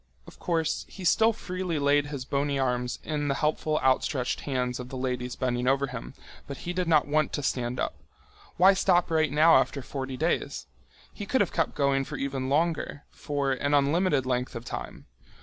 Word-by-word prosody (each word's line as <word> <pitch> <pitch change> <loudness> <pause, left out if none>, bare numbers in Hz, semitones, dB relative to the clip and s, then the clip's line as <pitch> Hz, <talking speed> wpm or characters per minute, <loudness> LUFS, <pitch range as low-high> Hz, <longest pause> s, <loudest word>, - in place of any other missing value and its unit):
Of - - -15
course, 165 -3 -1
he 190 - -10
still 225 +6 +4
freely 185 -5 -4
laid 145 0 +2
his 140 -3 -5
bony 140 +1 -1
arms 125 -2 -1
in 150 -2 -2
the 140 - +1
helpful 155 +1 0
outstretched 130 -1 +1
hands 125 -2 -2
of 125 0 -7
the 130 - -6
ladies 125 -1 -3
bending 125 -1 -1
over 135 +1 +3
him, - - -8 0.3
but 140 - -6
he 175 - -2
did 180 -1 -1
not 155 -3 +4
want 155 0 +1
to 145 - -2
stand 125 -1 -1
up. - - -1 0.6
Why 190 +3 +7
stop 175 -3 +2
right 155 -3 +2
now 155 +2 +6
after 135 +1 0
forty 130 0 -5
days? 160 +5 -1 0.5
He 205 - -7
could 260 - +2
have - - 0
kept 165 -3 0
going 140 -1 +2
for - - -6
even 135 -1 -3
longer, 155 0 0
for 140 -2 -2
an 145 +2 +1
unlimited 145 0 +2
length 125 0 -1
of 115 +1 -6
time. - - -7
140 Hz, 190 wpm, -27 LUFS, 130-160 Hz, 0.6 s, Why